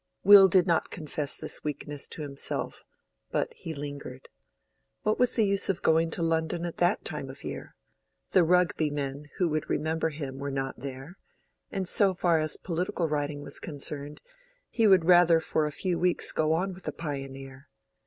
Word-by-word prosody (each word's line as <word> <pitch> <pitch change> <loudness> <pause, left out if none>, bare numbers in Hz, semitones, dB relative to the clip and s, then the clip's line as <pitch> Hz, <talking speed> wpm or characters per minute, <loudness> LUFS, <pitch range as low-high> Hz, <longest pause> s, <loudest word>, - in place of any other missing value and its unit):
Will 200 0 +9
did 185 -1 +4
not 170 -3 +1
confess 150 -3 -3
this - - -5
weakness 145 -1 -4
to 155 - -6
himself, 140 -1 -5 0.5
but - - -1
he 165 - -8
lingered. 140 -2 -7 0.7
What 215 - +1
was 250 -1 +3
the 225 - +2
use 195 0 +1
of 190 - -1
going 165 +1 +3
to 170 - -2
London 165 +1 0
at 170 - -6
that 175 +4 +1
time - - -3
of - - -9
the - - -5
year? - - -8 0.6
The 185 - +5
Rugby 170 -2 +2
men 145 0 -4
who 180 - +2
would 155 0 -2
remember 160 +1 0
him 140 -3 -6
were 140 0 -3
not 135 -2 -3
there; 135 +6 -8 0.5
and 190 -2 -3
so 195 0 +3
far 170 -2 +2
as 155 0 -1
political 175 -1 -2
writing 145 -1 -2
was 140 - -1
concerned, 145 -1 -6 0.5
he 225 -2 +3
would 190 -4 +5
rather 175 -2 +6
for 155 -1 0
a - - -4
few 175 +3 -1
weeks 180 0 +2
go 155 0 +1
on 185 +4 0
with 180 0 -11
the - - -3
"Pioneer." 135 -2 -7
160 Hz, 185 wpm, -28 LUFS, 145-180 Hz, 0.7 s, Will